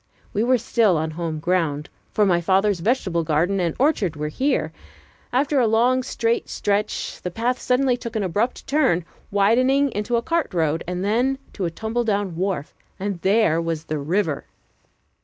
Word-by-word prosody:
We 210 - +1
were 255 +1 +4
still 225 -5 +2
on 155 +1 -2
home 160 -1 -3
ground, 160 -4 0 0.2
for 210 - +3
my 175 -3 +3
father's 195 +2 +2
vegetable 185 -5 0
garden 165 +5 +1
and 170 -3 0
orchard 245 - +1
were 150 0 -3
here. 255 - 0 0.6
After 275 +3 +2
a 240 - +3
long 240 +4 +3
straight 235 -2 -1
stretch, 205 +1 -2
the 180 - -3
path 235 +7 -1
suddenly 250 0 +2
took 235 -2 -7
an 215 - 0
abrupt 205 +7 -1
turn, 260 - +2 0.2
widening 255 +8 +3
into 210 +3 -1
a 235 - +1
cart 330 - -1
road, 160 -1 +1
then 215 +9 0 0.2
to 195 - -3
a - - 0
tumble 220 +7 -2
down 200 -5 -1
wharf, 180 -4 -2 0.3
and 195 -3 -3
there 190 -5 +3
was 165 -2 -3
the 155 -2 -3
river! 160 0 -1
200 Hz, 170 wpm, -23 LUFS, 170-240 Hz, 0.6 s, were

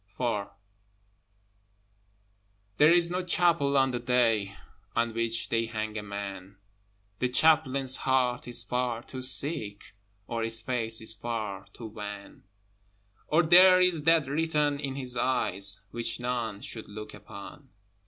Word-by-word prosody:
IV 110 -5 -1 2.3
There 150 +2 +6
is 175 0 +4
no 180 +1 -2
chapel 170 -6 +2
on 135 -1 +3
the 120 - -3
day 115 -5 +1 0.4
On 115 -1 0
which 115 0 -2
they 115 0 0
hang 110 -1 -4
a 110 - -3
man: 100 -1 -7 0.6
The 125 - 0
Chaplain's 135 -2 +3
heart 125 -2 0
is 120 - -1
far 125 -2 -2
too 130 0 -8
sick, 130 -6 0 0.3
Or 115 +2 -4
his 115 0 0
face 115 -2 0
is 110 0 +6
far 110 -5 -5
to 115 - -10
wan, 105 -3 -9 0.8
Or 165 +3 +3
there 185 +3 +7
is 180 -4 +2
that 165 -2 +4
written 150 -1 0
in 135 -2 -4
his 130 -2 -4
eyes 100 -6 +1
Which 120 0 -3
none 120 -4 -3
should 110 - -8
look 105 +1 -9
upon. 105 +7 -12
120 Hz, 135 wpm, -28 LUFS, 110-140 Hz, 2.3 s, there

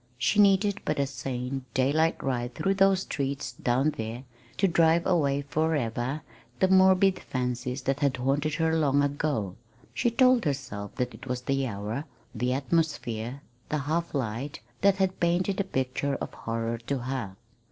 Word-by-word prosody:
She 195 - +1
needed 200 0 +4
but - - -1
a 140 - +2
sane, 130 0 -4
daylight 150 +5 +2
ride 125 -2 -2
through 195 - +1
those 195 -1 +4
streets 140 -7 -3
down 125 +4 +1
there 115 +3 -4 0.3
to 195 - +3
drive 165 -1 +3
away 145 -6 +2
forever 140 -2 -1 0.4
the 190 - +3
morbid 190 0 +5
fancies 125 +1 -3
that 135 +2 0
had 140 -3 +1
haunted 140 +4 0
her 160 0 +1
so 160 - +2
long. 145 - 0 0.4
She 240 - +1
told 255 -1 +4
herself 130 -8 -3
that 125 0 -2
it 130 - -11
was 125 -1 -2
the 135 0 0
hour, 105 +6 -4 0.3
the 125 +1 -1
atmosphere, 135 -4 -1 0.3
the 155 - 0
half 155 +3 -2
light, 130 +2 -3 0.2
that 200 -1 +5
had 190 -1 0
painted 175 +3 +1
the 200 - +1
picture 135 -4 -1
of - - -5
horror 115 0 -3
for 140 - 0
her. 125 -6 -4
140 Hz, 160 wpm, -28 LUFS, 125-165 Hz, 0.4 s, morbid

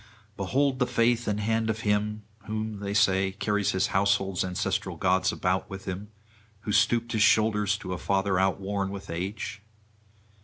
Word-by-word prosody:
Behold 130 +7 0
the 125 - +2
faith 120 -1 +2
and 105 0 0
hand 110 +1 0
of 110 0 -2
him! 105 0 0 0.2
who, 110 0 -3
they 100 0 -5
say, 95 -2 +3
carries 105 0 0
his 95 0 +2
household's 95 -1 +2
ancestral 90 -1 -2
gods 95 +1 +2
about 90 0 -1
with 95 0 -8
him! 95 +2 -5 0.5
who 105 - -4
stooped 115 +3 +2
his 110 - 0
shoulders 105 -1 +3
to 90 -2 -5
a 90 - -5
father 95 -1 +1
outworn 95 +1 0
with 100 -1 -7
age! 100 +4 -4
100 Hz, 160 wpm, -27 LUFS, 95-110 Hz, 0.5 s, say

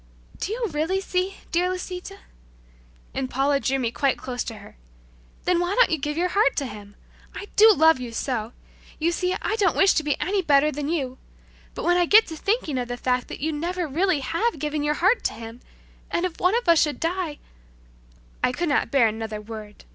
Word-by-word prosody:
"Do 390 - -3
you 470 +2 -1
really 320 +6 0
see, 375 0 -2 0.2
dear 355 +1 +2
Lisita?" 365 +1 -6 1.0
And 260 -1 -3
Paula 275 +2 +1
drew 270 0 0
me 240 -3 -1
quite 275 +1 +1
close 250 -1 -4
to 230 - -6
her. 205 - -13 0.7
"Then 360 -1 +2
why 355 +3 0
don't - - +4
you 320 - +1
give 295 +2 -3
your 360 +2 +1
heart 395 -7 +2
to 280 - -1
Him? 205 -4 -10 0.4
I 405 - -7
do 440 +1 +8
love 320 -6 +5
you 245 -2 -6
so! 230 -2 -3 0.5
You 330 +2 +1
see, 360 +1 -1
I 430 - 0
don't 390 -5 +2
wish 390 - +6
to - - 0
seem 300 -2 +1
to - - -8
be - - -28
any 390 +1 0
better 300 -2 +3
than 290 +1 -4
you 265 -6 -2 0.6
but - - -5
when 350 +1 +4
I 350 -1 +2
get 435 +4 +6
thinking 320 - -1
of 245 - -3
the 245 0 -4
fact 250 0 0
that - - -8
you 315 +2 -1
never 345 +3 -2
really 330 +1 +1
have 425 - -1
given 300 +1 -2
your 295 +1 0
heart 380 +9 +2
to - - +1
Him, 225 +1 -9 0.5
and 345 - 0
if 355 -3 -5
one 365 +4 +3
of 485 - -4
us 335 -2 +6
should 300 -2 0
die 335 -2 -2 0.6
" - - -30
I - - +3
could 340 +6 -2
not 285 - +1
bear 265 -5 +4
another 220 0 -4
word. 210 -1 -10
305 Hz, 220 wpm, -24 LUFS, 255-365 Hz, 1.0 s, do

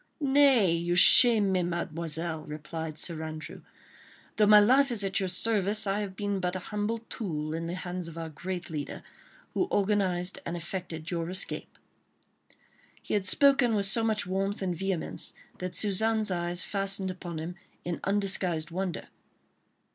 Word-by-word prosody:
"Nay! 270 - +4
you 170 +1 0
shame 215 +2 +7
me, 185 -1 +2
Mademoiselle," 165 -1 -3
replied 155 +1 -6
Sir 165 0 -2
Andrew; 155 -1 -7 0.8
"though 210 - +4
my 210 0 +9
life 260 +7 +5
is 230 -4 -2
at 195 0 0
your 190 -2 -1
service, 210 +2 0
I 195 +1 0
have 200 -2 -5
been 205 0 -2
but 180 0 -2
a 185 - -6
humble 210 +2 -1
tool 155 -7 -4
in 165 +1 -3
the 175 - -3
hands 180 -1 -5
of 165 0 -10
our 165 -1 -5
great 175 +3 -6
leader, 150 -2 -5 0.5
who 365 - 0
organised 190 -3 0
and 170 - -4
effected 170 -2 -6
your 170 -1 -2
escape." 185 +1 -1 1.2
He - - -6
had 200 -2 0
spoken 275 -5 +4
with 200 -1 +1
so 225 +4 0
much 220 -2 +1
warmth 195 +2 -2
and 180 -2 -1
vehemence 190 -1 0 0.2
that 180 0 -4
Suzanne's 215 +1 +1
eyes 175 0 -1
fastened 195 -1 -1
upon 175 -2 -7
him 160 +3 -5 0.3
in 175 -1 -3
undisguised 190 -5 0
wonder. 185 -1 -3
185 Hz, 160 wpm, -28 LUFS, 170-205 Hz, 1.2 s, my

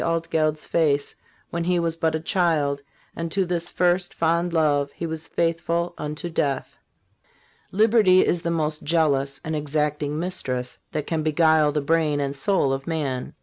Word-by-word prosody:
Altgeld's 160 -2 0
face 145 -4 +1 0.4
when 170 0 -2
he 180 0 +2
was 165 -1 0
but 160 -1 0
a - - -1
child, 160 -5 +1 0.3
and 165 0 -4
to 195 +1 +1
this 175 -1 -2
first, 180 0 +1
fond 170 +1 +1
love 145 -4 +2
he 170 - -4
was 160 -1 -5
faithful 170 +1 -1
unto 150 +3 -5
death. 145 -5 -2 1.0
Liberty 210 -3 +5
is 175 - +1
the 170 - -2
most 155 -2 -1
jealous 140 -4 +1
and 160 0 -2
exacting 150 0 -1
mistress 130 -8 -3
that 150 - -3
can 160 0 -1
beguile 155 -1 +3
the 150 0 -1
brain 155 0 +1
and 140 0 -2
soul 140 -2 +2
of 135 0 -5
man. 145 -6 -3
160 Hz, 160 wpm, -24 LUFS, 145-170 Hz, 1.0 s, Liberty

